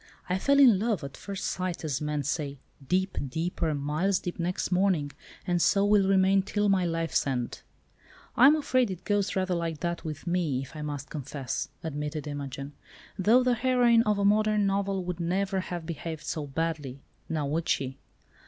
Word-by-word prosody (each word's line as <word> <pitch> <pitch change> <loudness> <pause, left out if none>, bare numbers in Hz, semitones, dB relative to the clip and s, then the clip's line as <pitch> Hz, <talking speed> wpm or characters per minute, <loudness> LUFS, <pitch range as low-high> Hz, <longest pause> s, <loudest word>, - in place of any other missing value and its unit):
I 180 +1 0
fell 280 +7 +3
in 240 -9 +7
love—at 195 - -2
first 200 -1 -6
sight 180 -2 -3
as 140 -3 -2
men 150 -1 -1
say—deep, 145 +6 -2
deeper, 160 +1 -1
miles 155 +7 0
deep 175 -1 -5
next 180 +2 -2
morning, 180 -6 +2 0.3
and 175 -1 +1
so 200 +3 +4
will 205 -2 +4
remain 195 0 +4
till 205 +1 0
my 190 -2 +3
life's 165 -3 0
end." 125 -3 -2 0.7
"I 255 - +8
am 300 - +7
afraid 255 -6 +1
it 185 -2 -6
goes 205 -1 0
rather 185 -1 0
like 165 -3 -2
that 170 -1 -2
with 155 0 -6
me, 170 -7 0
if 135 - -12
I 155 - -6
must 145 -1 -5
confess," 140 -3 -4
admitted 150 -1 -4
Imogen, 140 -1 -6 0.5
"though 230 +7 +5
the 250 0 +3
heroine 240 -1 +4
of 210 -2 +1
a 200 - +1
modern 210 0 +3
novel 195 -1 0
would 180 -1 -4
never 190 +3 0
have 175 -3 -5
behaved 160 -1 -5
so 150 -2 -3
badly, 145 -2 -3 0.3
now 155 -2 -1
would 160 +4 -2
she?" 135 0 -1
175 Hz, 175 wpm, -28 LUFS, 150-200 Hz, 0.7 s, I